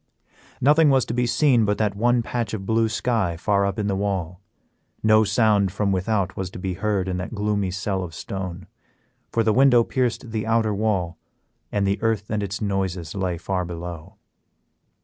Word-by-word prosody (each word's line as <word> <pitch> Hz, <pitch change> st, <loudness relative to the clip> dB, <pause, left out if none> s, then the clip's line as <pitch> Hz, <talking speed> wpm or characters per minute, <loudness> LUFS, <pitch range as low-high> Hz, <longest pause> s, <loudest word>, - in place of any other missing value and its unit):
Nothing 150 Hz, +3 st, +5 dB
was 135 Hz, -2 st, +3 dB
to -, -, -4 dB
be 125 Hz, 0 st, +1 dB
seen 120 Hz, 0 st, +3 dB
but 105 Hz, 0 st, +1 dB
that 105 Hz, -2 st, 0 dB
one 120 Hz, +3 st, +2 dB
patch 115 Hz, -2 st, -3 dB
of 95 Hz, -3 st, -6 dB
blue 115 Hz, +1 st, +2 dB
sky 110 Hz, -7 st, 0 dB
far 100 Hz, +2 st, +1 dB
up 100 Hz, +1 st, -3 dB
in 105 Hz, -, -1 dB
the 100 Hz, -1 st, 0 dB
wall. 95 Hz, -3 st, -2 dB, 0.6 s
No 110 Hz, 0 st, +5 dB
sound 105 Hz, -2 st, +2 dB
from 100 Hz, +1 st, 0 dB
without 95 Hz, 0 st, 0 dB
was 95 Hz, -1 st, -4 dB
to -, -, -10 dB
be 95 Hz, 0 st, -3 dB
heard 100 Hz, 0 st, -1 dB
in 90 Hz, -1 st, -2 dB
that 90 Hz, +5 st, -5 dB
gloomy 100 Hz, -2 st, 0 dB
cell 95 Hz, +1 st, -2 dB
of 80 Hz, -3 st, -8 dB
stone, 95 Hz, 0 st, -6 dB, 0.7 s
for 115 Hz, -, +1 dB
the 110 Hz, -1 st, +2 dB
window 125 Hz, -2 st, +5 dB
pierced 125 Hz, -1 st, -2 dB
the 110 Hz, 0 st, -3 dB
outer 110 Hz, -2 st, +2 dB
wall, 95 Hz, -5 st, -1 dB, 0.5 s
and 100 Hz, -1 st, 0 dB
the 100 Hz, +1 st, 0 dB
earth 110 Hz, -3 st, -1 dB
and 105 Hz, -1 st, 0 dB
its 100 Hz, 0 st, -4 dB
noises 95 Hz, -5 st, -2 dB
lay 95 Hz, -3 st, -2 dB
far 90 Hz, +2 st, -2 dB
below. 85 Hz, +2 st, -7 dB
100 Hz, 190 wpm, -23 LUFS, 95-110 Hz, 0.7 s, Nothing